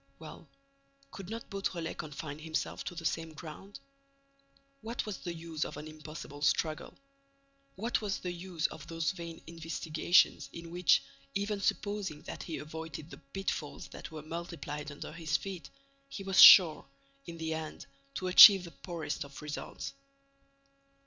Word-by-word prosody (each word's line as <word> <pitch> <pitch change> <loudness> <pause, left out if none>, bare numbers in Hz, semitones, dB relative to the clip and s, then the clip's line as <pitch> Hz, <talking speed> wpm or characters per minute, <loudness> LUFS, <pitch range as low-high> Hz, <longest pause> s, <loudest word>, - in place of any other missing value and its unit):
Well, 155 0 -11 0.6
could 195 -1 -9
not 230 +1 -6
Beautrelet 185 -4 -3
confine 150 0 -6
himself 160 0 -3
to 175 - -5
the 165 -1 -7
same 165 -1 -2
ground? 170 +6 -10 1.0
What 230 +2 -4
was 210 -3 -5
the 175 - -5
use 165 -2 -4
of - - -6
an 150 +1 -7
impossible 155 -2 -9
struggle? 155 +1 0 0.8
What 225 +5 -1
was 205 -2 -1
the 180 - -4
use 175 -2 -4
of 155 0 -3
those 165 -1 -1
vain 170 -3 -8
investigations, 165 -2 +1
in 170 0 -8
which, 180 0 +4 0.3
even 200 +1 -1
supposing 200 -6 -2
that - - -7
he 165 - -5
avoided 160 0 -7
the - - -10
pitfalls 180 -5 -4
that - - -9
were 155 -2 -8
multiplied 155 -3 -6
under 145 - -8
his 160 -3 0
feet, 180 -6 -7 0.4
he 200 - -7
was 195 0 +5
sure, 170 -5 +10 0.4
in 170 -1 -7
the 160 0 -2
end, 160 -1 -6 0.3
to 185 - -3
achieve 190 +1 +10
the 170 - -9
poorest 165 -6 -5
of 140 -1 -11
results? 150 -1 -6
165 Hz, 150 wpm, -32 LUFS, 155-185 Hz, 1.0 s, sure